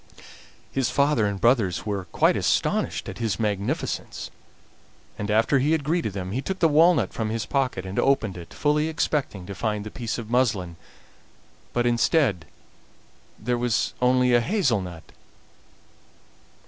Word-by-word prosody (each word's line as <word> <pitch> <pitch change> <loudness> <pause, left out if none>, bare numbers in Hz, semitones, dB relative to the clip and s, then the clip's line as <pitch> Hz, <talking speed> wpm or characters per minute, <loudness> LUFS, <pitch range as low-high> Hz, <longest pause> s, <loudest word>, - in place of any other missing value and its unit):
His 135 -2 0
father 140 -7 +2
and 100 -1 -3
brothers 115 -7 +2
were 100 -3 -3
quite 85 - +2
astonished - - 0
at - - -7
his 110 -6 -1
magnificence, 105 -2 -2 0.9
and 105 - -3
after 115 +6 +3
he 145 +5 +2
had 160 -3 0
greeted 155 - -1
them 95 -1 -5
he 125 +6 -2
took 190 +6 -3
the 170 - +4
walnut 155 - +4
from 110 -2 -2
his 110 0 -2
pocket 130 -7 -1
and 95 +1 -3
opened 115 -8 +2
it, 85 -2 -10
fully 150 +1 +1
expecting 145 - -2
to 100 - -6
find 105 +2 -2
the 105 - -7
piece 115 -3 -4
of 115 -3 -6
muslin, 105 -8 0 1.0
but 120 0 0
instead 120 - +2 0.9
there 120 +2 -1
was 120 -2 0
only 125 0 +3
a 120 - +5
hazel 150 - +1
nut. 85 -3 -8
115 Hz, 150 wpm, -25 LUFS, 100-140 Hz, 1.0 s, a